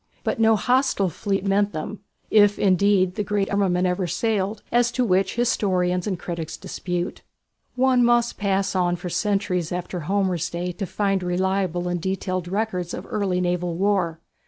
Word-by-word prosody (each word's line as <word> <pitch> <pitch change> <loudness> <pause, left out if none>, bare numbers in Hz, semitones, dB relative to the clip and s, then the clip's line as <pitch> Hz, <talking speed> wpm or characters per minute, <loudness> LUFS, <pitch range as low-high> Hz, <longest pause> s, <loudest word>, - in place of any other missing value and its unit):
But - - -1
no 225 0 +5
hostile 250 -4 +2
fleet 195 +4 -2
met 200 +1 +2
them, 195 +7 -5 0.3
if 205 -1 +5
indeed 190 -1 +3
the 210 - -2
great 205 0 -1
armament 185 -3 +2
ever 180 0 0
sailed, 205 +1 -1
as 240 0 +3
to 250 - +1
which 190 -2 +1
historians 185 -6 +1
and 190 -3 -1
critics 170 -2 -5
dispute. 180 0 -4 0.5
One 255 -1 +3
must 240 0 +3
pass 195 -1 0
on 175 -1 +2
for 180 +1 -6
centuries 195 -5 0
after 180 0 -4
Homer's 185 0 0
day 175 +1 -3
to 185 +2 -5
find 195 +1 0
reliable 180 0 0
and 175 -1 -2
detailed 185 -1 -2
records 185 -3 -2
of 180 - -7
early 195 -3 0
naval 175 -1 -1
war. 180 -4 0
190 Hz, 160 wpm, -23 LUFS, 180-205 Hz, 0.5 s, no